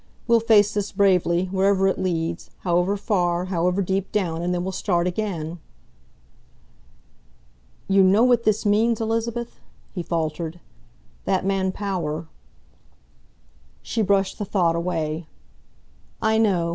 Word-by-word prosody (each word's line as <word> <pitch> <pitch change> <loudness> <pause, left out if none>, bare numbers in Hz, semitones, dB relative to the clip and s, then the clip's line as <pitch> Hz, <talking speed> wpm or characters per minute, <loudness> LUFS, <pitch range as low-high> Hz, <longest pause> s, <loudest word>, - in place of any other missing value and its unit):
We'll 235 -1 +4
face 215 -2 +4
this 205 -1 -2
bravely, 180 -3 +2
wherever 195 0 +2
it 190 - 0
leads, 170 -2 -2
however 180 +3 +1
far, 180 -4 0
however 180 +3 +1
deep 190 +1 -2
down, 170 -5 -1
and 175 +1 -1
then 175 0 -1
we'll 190 - -3
start 175 -2 0
again." 175 -4 -3 2.3
"You 195 0 +4
know 195 +4 +5
what 245 -2 +4
this 215 0 +1
means, 220 +2 +2
Elizabeth?" 230 +1 -2 0.3
he 180 - -3
faltered. 165 0 -3 0.7
"That 190 -1 0
man 195 -1 +1
Power 170 -6 -3 0.8
" - - -35
She 225 - -2
brushed 195 -2 +1
the 205 - -2
thought 175 -4 +1
away. 165 -2 -2 0.9
"I 220 0 +2
know. 185 -6 +2
190 Hz, 130 wpm, -23 LUFS, 175-205 Hz, 2.3 s, know